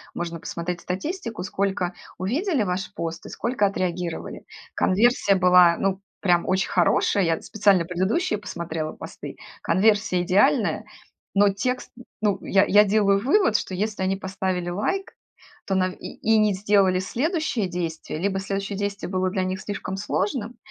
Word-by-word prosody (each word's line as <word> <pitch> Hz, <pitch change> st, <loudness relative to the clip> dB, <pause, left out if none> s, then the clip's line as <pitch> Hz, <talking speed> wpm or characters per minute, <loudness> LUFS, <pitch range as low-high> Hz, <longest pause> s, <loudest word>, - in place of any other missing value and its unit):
можно 170 Hz, -1 st, -4 dB
посмотреть 170 Hz, +2 st, -4 dB
статистику, 225 Hz, -, -4 dB
сколько 190 Hz, -2 st, -1 dB, 0.2 s
увидели 265 Hz, -, 0 dB
ваш 185 Hz, +1 st, -3 dB
пост 165 Hz, 0 st, -4 dB
и -, -, -9 dB
сколько 235 Hz, -4 st, 0 dB
отреагировали. 180 Hz, -3 st, -4 dB, 0.3 s
Конверсия 205 Hz, 0 st, +3 dB
была, 180 Hz, -2 st, +6 dB
ну, 195 Hz, 0 st, -1 dB, 0.2 s
прям 175 Hz, -3 st, +2 dB
очень 185 Hz, 0 st, +1 dB
хорошая. 185 Hz, +2 st, +3 dB
Я 165 Hz, -1 st, 0 dB
специально 200 Hz, -5 st, +2 dB
предыдущие 195 Hz, -, 0 dB
посмотрела 165 Hz, -5 st, -5 dB
посты. -, -, -9 dB, 0.2 s
Конверсия 195 Hz, 0 st, +2 dB
идеальная, 205 Hz, -, +2 dB, 0.5 s
но 200 Hz, 0 st, +5 dB
текст 250 Hz, +6 st, -2 dB
н 245 Hz, -, -11 dB, 0.2 s
ну, 205 Hz, -3 st, +1 dB
я 195 Hz, +1 st, +3 dB
я 205 Hz, +1 st, +6 dB
делаю 200 Hz, 0 st, +2 dB
вывод, 290 Hz, -, +3 dB
что 185 Hz, -, -5 dB
если 210 Hz, +1 st, -2 dB
они 190 Hz, +1 st, +1 dB
поставили 190 Hz, -2 st, -3 dB
лайк, 370 Hz, -, -2 dB, 0.5 s
то 195 Hz, -, 0 dB
нав 185 Hz, -1 st, +1 dB
и -, -, -9 dB
и 220 Hz, 0 st, +3 dB
не 210 Hz, -1 st, +3 dB
сделали 195 Hz, -1 st, +3 dB
следующее 265 Hz, -, -1 dB
действие, 165 Hz, -3 st, -4 dB
либо 195 Hz, +2 st, 0 dB
следующее 195 Hz, +1 st, -3 dB
действие 200 Hz, -1 st, -3 dB
было 185 Hz, 0 st, 0 dB
для 190 Hz, -1 st, -1 dB
них 185 Hz, +1 st, -3 dB
слишком 195 Hz, -2 st, -5 dB
сложным, 210 Hz, +4 st, -2 dB
195 Hz, 150 wpm, -24 LUFS, 180-210 Hz, 0.5 s, была